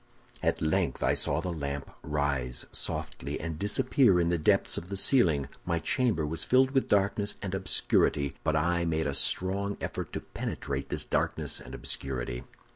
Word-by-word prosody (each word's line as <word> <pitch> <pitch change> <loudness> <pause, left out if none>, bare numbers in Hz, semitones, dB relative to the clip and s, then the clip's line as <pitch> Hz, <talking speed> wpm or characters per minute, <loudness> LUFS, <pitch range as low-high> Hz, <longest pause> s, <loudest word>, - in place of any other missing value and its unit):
"At - - 0
length 80 - 0
I - - +3
saw 70 +3 +1
the 90 0 -3
lamp 70 -2 -4
rise 70 -4 -1
softly, 70 +3 -2
and 80 -1 -5
disappear 105 - +3
in 85 -1 +2
the 85 -1 +1
depths 75 - +2
of 85 - -4
the 100 +1 -4
ceiling; 85 - +4 0.2
my 85 -1 0
chamber 105 - +1
was 80 +2 -2
filled 130 +1 +4
with 135 -1 +1
darkness 100 +1 +1
and 95 -2 -3
obscurity, 85 -6 +1
but 80 - +1
I 85 +2 +1
made 80 -1 0
a 70 - -1
strong 100 +6 +2
effort - - -4
to - - -3
penetrate 70 -1 -4
this - - 0
darkness - - -1
and - - -9
obscurity. - - -3
80 Hz, 170 wpm, -29 LUFS, 70-100 Hz, 0.2 s, ceiling